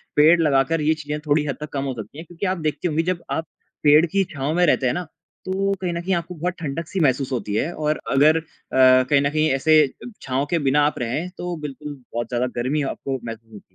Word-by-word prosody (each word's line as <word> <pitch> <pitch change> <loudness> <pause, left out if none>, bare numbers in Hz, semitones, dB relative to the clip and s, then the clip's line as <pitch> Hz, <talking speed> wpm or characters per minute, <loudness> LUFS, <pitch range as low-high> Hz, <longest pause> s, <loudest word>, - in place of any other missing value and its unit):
पेड़ 160 +4 +6
लगाकर 150 +1 +2
ये 155 +1 +3
चीज़ें 150 -1 -5
थोड़ी 150 0 +2
हद 140 - -2
तक 150 0 -6
कम 135 - -1
हो 135 - -2
सकती 110 +3 -9
हैं 165 - -8
क्योंकि 175 +4 -6
आप 185 0 0
देखती 155 +1 -2
होंगी 160 0 0
जब 180 0 -2
आप 160 - -1 0.4
पेड़ 150 +2 +6
की 195 +4 +1
छाँव 140 +1 -2
में 180 0 +4
रहते 140 -4 +2
हैं - - +1
ना, 180 - -3 0.4
तो 195 +1 0
कहीं 180 -2 -1
न 170 - -3
कहीं 190 +2 -1
आपको 170 +1 -4
बहुत 175 +3 -2
ठंडक-सी 165 +4 -4
महसूस 135 -2 +1
होती 105 -5 -2
है 140 +10 0
और 155 0 -1
अगर 150 +4 +5
अ, - - -2 0.3
कहीं 130 +1 +5
न 140 - +1
कहीं 155 +1 +1
ऐसे 155 +3 +5
अ, - - -11 0.2
छाँव 130 +2 -1
के 170 - +1
बिना 145 0 +2
आप - - -3
रहें, 130 +9 -2
तो 175 0 -4
बिल्कुल 150 +1 -6 0.2
बहुत 120 -1 -2
ज़्यादा 125 +1 -1
गर्मी 145 +5 0
आपको 135 -1 -4
महसूस 115 -2 -9
150 Hz, 235 wpm, -22 LUFS, 135-165 Hz, 0.4 s, पेड़